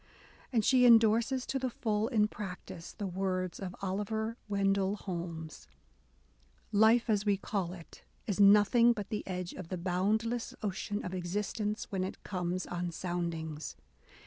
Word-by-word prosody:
And 225 -4 +2
she 255 -1 +5
endorses 235 +2 +5
to 270 - -2
the 260 -1 -1
full, 220 -2 -1
in 215 -4 +3
practice, 185 -4 -7
the 205 - -5
words 185 -1 -2
of 185 -2 -5
Oliver 220 +4 -2
Wendell 195 0 +1
Holmes: 170 -5 -6 1.0
Life, 220 +3 +5
as 210 -3 +2
we 205 -2 +2
call 190 -3 -2
it, 170 -3 -12 0.2
is 205 -2 -2
nothing 210 +4 +6
but 205 -3 -6
the 210 - -2
edge 180 -1 -4
of 185 - -8
the 185 - -4
boundless 210 +7 0
ocean 205 +1 -3
of 180 - -4
existence 205 +4 -2
when 190 -2 -1
it 190 - -6
comes 180 -1 -2
on 175 0 -3
soundings. 165 -3 -4
200 Hz, 145 wpm, -32 LUFS, 180-220 Hz, 1.0 s, nothing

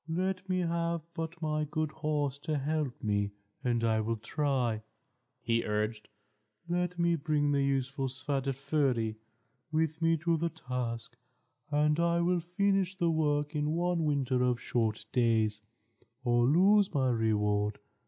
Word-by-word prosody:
"Let 185 +2 -2
me 185 0 +1
have 170 -1 -1
but 165 0 -5
my 155 0 0
good 155 +1 -2
horse 150 -3 -1
to 155 0 -2
help 145 -2 -2
me, 100 -1 0 0.3
and 120 -3 +1
I 110 -1 +2
will 115 +1 -1
try," 125 -3 0 0.6
he 115 0 +1
urged. 105 +1 -2 0.6
"Let 180 +1 -1
me 170 0 +3
bring 150 -2 +1
the 140 -1 +2
useful 135 0 0
Svadilföri 135 -3 -1 0.5
with 160 0 0
me 165 0 +3
to 165 +1 +1
the 170 +2 0
task, 125 -7 -4 0.5
and 150 +1 +2
I 170 0 +2
will 175 +1 +2
finish 195 +2 +1
the 170 -2 +2
work 150 -1 0
in 150 +1 0
one 175 -1 +1
winter 135 -4 +1
of 125 -1 +2
short 110 -4 -1
days, 110 -4 +2 0.6
or 120 -1 +3
lose 195 +7 +5
my 130 -4 +2
reward. 105 -2 +1
145 Hz, 145 wpm, -31 LUFS, 120-165 Hz, 0.6 s, lose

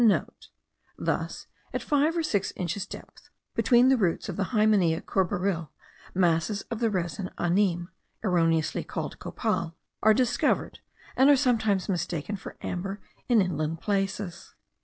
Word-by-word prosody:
(* - - -43
Thus, - - -2 0.3
at - - -2
five 300 +3 +2
or 330 - +1
six 205 -11 0
inches 185 +3 -3
depth, - - -11 0.2
between 245 +1 +5
the 265 - +5
roots 190 -1 0
of 185 - -3
the 195 - 0
Hymenea 205 -7 +3
courbaril, 180 -3 0 0.5
masses 175 +3 +2
of 230 - -2
the 230 -2 +2
resin 180 -2 -2
anime 175 0 +1 0.3
(erroneously 165 -5 +2
called - - -5
copal) 165 -1 -2 0.3
are 220 0 +6
discovered, 245 0 +1 0.4
and 265 +2 +5
are 290 - +8
sometimes 220 -7 +2
mistaken 175 0 -2
for 195 - -9
amber 195 +3 -3 0.3
in 230 -5 +5
inland 165 -3 -2
places. 195 -2 -2
195 Hz, 140 wpm, -27 LUFS, 170-220 Hz, 0.5 s, are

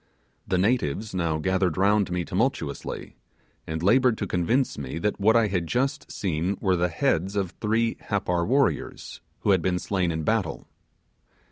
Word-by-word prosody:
The 95 - +1
natives 105 - 0
now 85 -4 0
gathered 95 0 0
round 100 +1 +3
me 90 -1 -2
tumultuously, 95 - -2 0.5
and 80 +1 -3
laboured 120 +3 +4
to 105 - -2
convince 100 +9 +1
me 70 +2 -5
that 105 +5 -1
what 110 +3 +4
I 115 -1 +5
had 90 -4 -1
just 135 - -1
seen 90 +1 -1
were 95 -2 +2
the 90 0 +1
heads 100 - 0
of 95 -4 -1
three 115 +1 +1
Happar 90 -4 0
warriors, 135 +3 0 0.2
who 105 - +2
had 95 -3 +4
been 90 +1 0
slain 90 -1 -1
in 80 -1 -3
battle. 105 -4 -1
95 Hz, 160 wpm, -25 LUFS, 85-110 Hz, 0.5 s, I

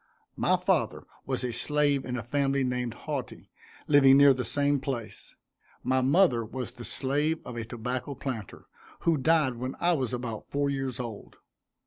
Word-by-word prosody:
My - - +2
father - - 0 0.2
was 130 -1 -2
a 125 -1 -2
slave 145 +2 +1
in 125 0 -3
a 120 - -4
family 135 +2 0
named 125 -2 -2
Hauty, 145 -5 -5 0.3
living 135 -2 +6
near 140 -1 +8
the 125 -1 -3
same 145 +1 +1
place. 130 -4 -5 0.5
My 130 +1 +2
mother 135 -3 +4
was 120 +1 -5
the 120 -1 -11
slave 150 +6 -1
of 125 - -7
a 115 -1 -4
tobacco 125 +4 -4
planter, 125 -7 -6 0.4
who 165 - +3
died 145 -3 +2
when 130 +2 -4
I 175 +1 +3
was 130 -7 -1
about 120 -3 -5
four 140 0 0
years 135 -2 -3
old. 115 -4 -7
130 Hz, 165 wpm, -28 LUFS, 125-140 Hz, 0.5 s, near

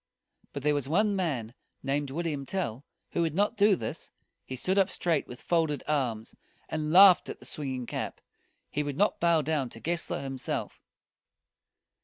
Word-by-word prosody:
But 140 - -6
there 150 0 +3
was 140 -2 -2
one 205 +5 +3
man, 135 - -2 0.3
named 140 +1 -1
William 150 -1 -2
Tell, 135 - -3 0.3
who - - 0
would 165 -2 0
not 205 +4 +2
do 205 -1 +5
this. - - -5 0.3
He 130 - -6
stood 185 +10 +1
up 195 0 +3
straight 165 -5 0
with 125 - -10
folded 160 -4 +1
arms, 120 -7 -1 0.4
and 155 -1 -2
laughed 185 0 +8
at - - -6
the - - -13
swinging 130 -4 -4
cap. - - -4 0.5
He 150 - 0
would 145 -2 -3
not 205 +2 +2
bow 170 -2 +3
down 145 -4 0
to 115 - -11
Gessler 170 0 -2
himself. 135 -1 -4
150 Hz, 170 wpm, -29 LUFS, 135-175 Hz, 0.5 s, laughed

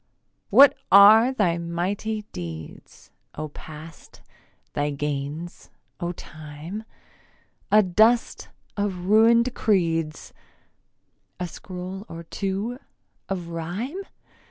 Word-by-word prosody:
What 280 +1 +8 0.2
are 215 +5 +8
thy 180 -9 +1
mighty 190 +6 -3
deeds, 80 -3 -9 0.2
O 155 0 -5
Past, 155 +2 -12 0.5
thy 145 0 0
gains, 145 +3 -5 0.3
O 175 -1 -2
Time? 155 +5 -9 0.9
A 215 0 +6
dust 220 +6 +2 0.3
of 195 -4 -2
ruin'd 230 +4 +5
creeds, 165 -6 0 1.1
A 180 - -2
scroll 185 +3 -8
or 165 0 -8
two 200 +8 -3 0.5
of 180 -3 -4
rhyme? 185 - -4
180 Hz, 90 wpm, -24 LUFS, 160-215 Hz, 1.1 s, What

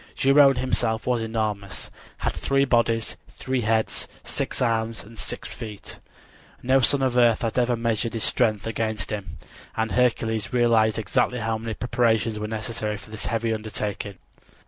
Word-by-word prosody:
Geryone 135 0 +6
himself 115 -3 0
was 125 -2 +1
enormous, 110 -3 -3 0.3
had - - -1
three 135 0 +1
bodies, 115 -3 +1
three 130 -1 -2
heads, 110 0 0 0.2
six - - -3
arms 115 -2 0
and 110 +3 -14
six - - -5
feet. 105 -3 -8 0.6
No 130 +2 +4
son 135 +2 +2
of 130 -2 +1
earth 120 -2 +4
had 115 +2 0
ever 120 0 +2
measured 115 0 -1
his 115 - -1
strength 110 -5 +1
against 110 -2 -2
him, 100 -5 -5 0.4
and 110 -1 0
Hercules 110 -1 +1
realized 115 -3 +3
exactly 125 +4 +1
how 110 -1 -1
many 115 -1 -4
preparations 115 -3 +1
were 105 - -3
necessary 110 -1 -3
for 110 - -13
this 110 - -5
heavy 115 -1 0
undertaking. 105 -2 -4
115 Hz, 155 wpm, -25 LUFS, 110-120 Hz, 0.6 s, Geryone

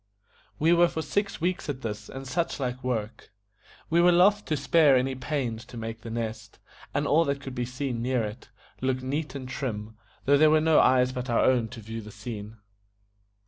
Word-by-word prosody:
We 165 +3 +4
were 175 0 +5
for 160 -1 -4
six 200 +3 -1
weeks 175 -1 -1
at 135 -2 -4
this 105 -2 -5
and 135 0 -7
such 170 +3 -1
like 125 -1 -3
work. 115 -3 -3 0.6
We 170 +1 +5
were 175 +1 +6
loth 200 +4 +4
to 155 - -1
spare 140 +1 +4
any 130 +1 +1
pains 125 -3 -3
to 120 -1 -11
make 115 0 -6
The 115 - -8
Nest, 110 -1 -5 0.3
and 145 +1 -1
all 155 +4 +4
that 140 -1 -1
could 135 -2 -7
be 125 -1 -2
seen 125 -1 -3
near 125 -1 0
it, 105 +3 -7 0.3
look 130 0 -1
neat 145 +3 -3
and 130 -2 -6
trim, 110 -5 -4 0.3
though 140 +1 +5
there 155 0 +7
were 155 0 +5
no 155 0 +4
eyes 125 0 +4
but 125 -1 -5
our 115 - +3
own 125 -3 +3
to 115 0 -10
view 110 +1 -6
the 105 - -10
scene. 105 0 -7
130 Hz, 205 wpm, -27 LUFS, 115-150 Hz, 0.6 s, there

